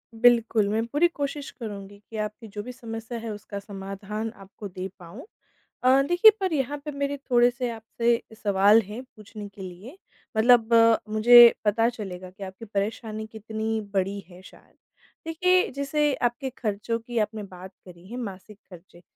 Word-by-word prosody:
बिल्कुल, 230 Hz, -3 st, +4 dB
मैं 225 Hz, +2 st, 0 dB
पूरी 295 Hz, +8 st, +3 dB
कोशिश 285 Hz, -3 st, -4 dB
करूँगी 205 Hz, -4 st, -8 dB
कि 220 Hz, -, -7 dB
आपकी 215 Hz, +2 st, -5 dB
जो 205 Hz, 0 st, -6 dB
भी 250 Hz, -, -7 dB
समस्या 230 Hz, -1 st, -7 dB
है 225 Hz, 0 st, -6 dB
उसका 205 Hz, -1 st, -7 dB
समाधान 200 Hz, +2 st, -6 dB
आपको 200 Hz, +1 st, -10 dB
दे 185 Hz, 0 st, -6 dB
पाऊँ। 190 Hz, -, -11 dB, 0.6 s
अ, 260 Hz, +2 st, +5 dB
देखिए, 355 Hz, +5 st, +7 dB
पर 375 Hz, -4 st, -1 dB
यहाँ 285 Hz, 0 st, -1 dB
पर 300 Hz, -, -3 dB
मेरे 280 Hz, 0 st, -2 dB
थोड़े-से 245 Hz, 0 st, +3 dB
आपसे 230 Hz, +1 st, -1 dB
सवाल 205 Hz, +1 st, +4 dB
हैं 210 Hz, +5 st, -8 dB
पूछने 215 Hz, -3 st, -11 dB
के 200 Hz, 0 st, -13 dB
लिए, 190 Hz, -, -10 dB, 0.4 s
मतलब 235 Hz, 0 st, +5 dB, 0.4 s
मुझे 235 Hz, +2 st, +8 dB
पता 225 Hz, +3 st, +3 dB
चलेगा 185 Hz, -6 st, -7 dB
कि 190 Hz, +2 st, -11 dB
आपकी 190 Hz, +4 st, -9 dB
परेशानी 215 Hz, +1 st, -3 dB
कितनी 220 Hz, 0 st, -3 dB
बड़ी 195 Hz, +1 st, 0 dB
है 180 Hz, +1 st, -14 dB
शायद। -, -, -18 dB, 0.5 s
देखिए, 365 Hz, +3 st, +2 dB
जैसे 280 Hz, +2 st, 0 dB
आपके 250 Hz, +3 st, -1 dB
खर्चों 220 Hz, +1 st, -2 dB
की 235 Hz, +1 st, -7 dB
आपने 215 Hz, 0 st, -2 dB
बात 185 Hz, 0 st, -11 dB
करी 180 Hz, 0 st, -14 dB
है, 240 Hz, -, -7 dB
मासिक 205 Hz, -3 st, -7 dB
खर्चे, 175 Hz, -1 st, -15 dB
220 Hz, 160 wpm, -25 LUFS, 200-245 Hz, 0.6 s, मुझे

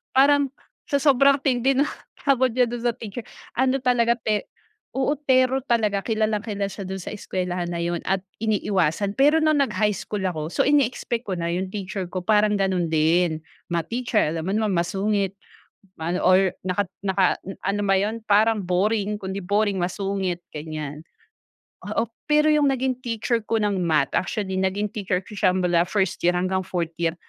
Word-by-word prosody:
parang 280 Hz, +1 st, +5 dB, 0.4 s
sa 280 Hz, -, +2 dB
sobrang 275 Hz, 0 st, +5 dB
tindi 265 Hz, 0 st, +2 dB
ng 285 Hz, +2 st, +3 dB, 0.3 s
takot 260 Hz, -2 st, +3 dB
niya 250 Hz, -1 st, +4 dB
dun 240 Hz, 0 st, -5 dB
sa 240 Hz, -1 st, +1 dB
teacher, 225 Hz, +1 st, -7 dB, 0.4 s
ano 260 Hz, +1 st, +3 dB
talaga 240 Hz, -2 st, +3 dB
te 215 Hz, -2 st, -2 dB, 0.5 s
oo, 265 Hz, +2 st, +1 dB, 0.2 s
terror 260 Hz, 0 st, +4 dB
talaga 215 Hz, -4 st, +2 dB
kilalang-kilala 215 Hz, -2 st, -1 dB
siya 195 Hz, -2 st, -7 dB
dun 190 Hz, -1 st, -5 dB
sa -, -, -6 dB
eskwelahan 180 Hz, -3 st, -3 dB
na 170 Hz, -1 st, -3 dB
yun 170 Hz, 0 st, -1 dB
at 190 Hz, 0 st, 0 dB, 0.2 s
iniiwasan. 200 Hz, -4 st, 0 dB
Pero 300 Hz, +3 st, +5 dB
nung 310 Hz, -2 st, +3 dB
nag 275 Hz, -, +1 dB
high 210 Hz, -1 st, +2 dB
school 200 Hz, 0 st, -4 dB
ako. 160 Hz, -5 st, -2 dB
So, 170 Hz, -, 0 dB
ini-expect 255 Hz, -4 st, +1 dB
ko 190 Hz, -, -1 dB
na 170 Hz, -1 st, -2 dB
yung 185 Hz, +2 st, -1 dB
teacher 190 Hz, -1 st, -5 dB
ko 180 Hz, 0 st, -5 dB
parang 210 Hz, +1 st, +3 dB
ganun 190 Hz, -3 st, +1 dB
din. 160 Hz, +1 st, +2 dB, 0.2 s
Math 170 Hz, -2 st, -3 dB
teacher, 240 Hz, -2 st, +1 dB
alam 165 Hz, +1 st, -4 dB
mo 195 Hz, -, 0 dB
naman 215 Hz, -1 st, +1 dB
masungit 195 Hz, +2 st, 0 dB, 0.7 s
maano 170 Hz, +3 st, -1 dB
or 185 Hz, +1 st, +5 dB, 0.2 s
naka 185 Hz, +1 st, -1 dB, 0.2 s
naka 190 Hz, -1 st, +3 dB, 0.4 s
ano 200 Hz, +2 st, -1 dB
ba 195 Hz, -, +3 dB
yun, 210 Hz, +3 st, -1 dB
parang 215 Hz, 0 st, +3 dB
boring, 205 Hz, +3 st, 0 dB
kung 190 Hz, 0 st, -4 dB
di 200 Hz, -, -4 dB
boring, 205 Hz, +1 st, +1 dB
masungit, 190 Hz, -1 st, -2 dB, 0.2 s
gan'yan. 150 Hz, -1 st, -6 dB, 0.8 s
Oo, 235 Hz, -, -1 dB, 0.2 s
pero 300 Hz, +1 st, +4 dB
yung 300 Hz, -1 st, +4 dB
naging 260 Hz, -1 st, -1 dB
teacher 235 Hz, +1 st, 0 dB
ko 225 Hz, -1 st, +1 dB
ng 205 Hz, -2 st, +1 dB
math, 155 Hz, -4 st, +2 dB
actually 190 Hz, 0 st, -2 dB
naging 190 Hz, +2 st, 0 dB
teacher 190 Hz, -3 st, -1 dB
ko 205 Hz, -, -15 dB
siya 185 Hz, 0 st, +4 dB
mula 175 Hz, -2 st, +2 dB
first 190 Hz, -1 st, 0 dB
year 175 Hz, -, +5 dB
hanggang 185 Hz, +1 st, 0 dB
fourth 170 Hz, -3 st, -2 dB
year, 165 Hz, -1 st, 0 dB
200 Hz, 175 wpm, -24 LUFS, 180-235 Hz, 0.8 s, parang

